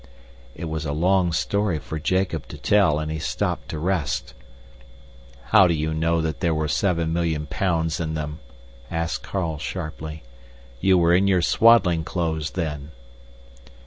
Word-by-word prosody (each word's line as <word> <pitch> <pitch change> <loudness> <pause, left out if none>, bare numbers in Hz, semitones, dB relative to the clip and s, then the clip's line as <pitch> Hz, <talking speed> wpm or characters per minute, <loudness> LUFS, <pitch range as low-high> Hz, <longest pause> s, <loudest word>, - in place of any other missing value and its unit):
It 85 - -6
was 80 -1 -3
a 70 - -2
long 90 +3 +2
story 100 +2 0
for 75 +2 -6
Jacob 90 0 -1
to - - -9
tell, 100 -8 +3
and 80 0 -3
he 80 - -3
stopped - - -2
to 80 - -4
rest. 85 -2 -1 1.2
"How 95 - +7
do 85 - +1
you 80 +1 -1
know 80 +1 +1
there 80 +1 -1
were 75 0 -1
seven 85 -1 0
million 80 -3 -1
pounds 80 +1 -1
in 80 -1 -2
them?" 75 0 -4 0.5
asked 85 -1 -2
Carl 85 -6 -3
sharply. 80 -2 -6 0.6
"You 95 +6 +4
were 85 0 +4
in 95 +3 +4
your 90 -3 +3
swaddling 95 -9 +4
clothes 80 -2 -2
then." 75 -4 -3
80 Hz, 150 wpm, -23 LUFS, 80-90 Hz, 1.2 s, How